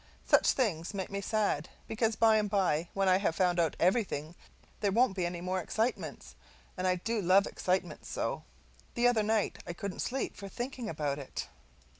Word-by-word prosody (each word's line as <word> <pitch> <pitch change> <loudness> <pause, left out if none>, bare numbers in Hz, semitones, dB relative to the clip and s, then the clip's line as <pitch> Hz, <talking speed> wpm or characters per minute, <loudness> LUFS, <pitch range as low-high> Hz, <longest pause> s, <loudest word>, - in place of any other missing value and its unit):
Such - - +5
things 200 - -1
make 190 -1 -4
me 200 0 -2
sad; 200 -7 0 0.2
because 220 0 0
by 220 -1 +5
and 210 -1 0
by 175 -5 +1
when 195 0 +2
I 185 0 +5
have 180 -5 0
found 180 -1 +2
out 165 -2 +2
everything 175 -5 +1 0.5
there 200 -2 +1
won't 230 -1 +3
be 180 -3 0
any 175 0 -5
more 185 +1 -1
excitements, 225 +7 -2 0.4
and 185 0 -1
I 185 - +3
do 220 +5 -2
love 190 +2 +5
excitements 185 +1 -2
so! - - -2 0.5
The 240 +1 +4
other 240 -3 +3
night 215 0 0
I 175 - -3
couldn't 190 +2 -5
sleep 265 +1 -2
for 200 -1 -8
thinking 245 +1 -5
about 145 -3 -2
it. 135 - -6
195 Hz, 185 wpm, -31 LUFS, 175-220 Hz, 0.5 s, Such